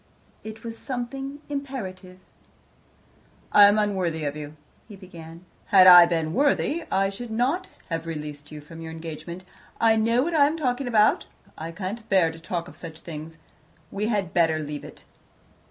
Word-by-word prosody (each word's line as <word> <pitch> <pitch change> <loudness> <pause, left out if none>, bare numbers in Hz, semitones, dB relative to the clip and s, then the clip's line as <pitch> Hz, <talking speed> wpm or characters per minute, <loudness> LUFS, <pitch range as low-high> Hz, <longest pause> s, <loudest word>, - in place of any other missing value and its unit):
It 220 +1 -9
was 230 -1 -7
somehow 270 +1 -5
imperative. 205 -11 -6 1.3
"I 205 - +8
am 205 +1 +5
unworthy 185 -6 0
of 145 0 -2
you," 150 0 -8 0.3
he 210 - -11
began. 170 -2 -12 0.2
"Had 190 -2 +7
I 175 -1 +10
been 165 -2 -1
worthy, 290 +4 +1
I 195 0 +1
should 235 +4 -8
not 265 +12 0 0.2
have 165 0 -3
released 150 -2 -7
you 150 -1 -8
from 165 +2 -12
your 160 0 -7
engagement. 165 +2 -8 0.4
I 225 -1 +4
know 230 +3 +2
what 340 +3 -2
I 285 -3 +5
am 310 +3 -2
talking 260 -3 -1
about. 215 -3 +3 0.3
I 165 +1 -6
can't 205 +6 -6
bear 185 -4 +3
to 165 - -12
talk 170 +1 -4
of - - -13
such 165 -1 -10
things. 160 0 -8 0.5
We 205 +2 -2
had 205 -6 -1
better 165 -2 +3
leave 150 -1 -5
it. - - -12
185 Hz, 170 wpm, -25 LUFS, 165-230 Hz, 1.3 s, I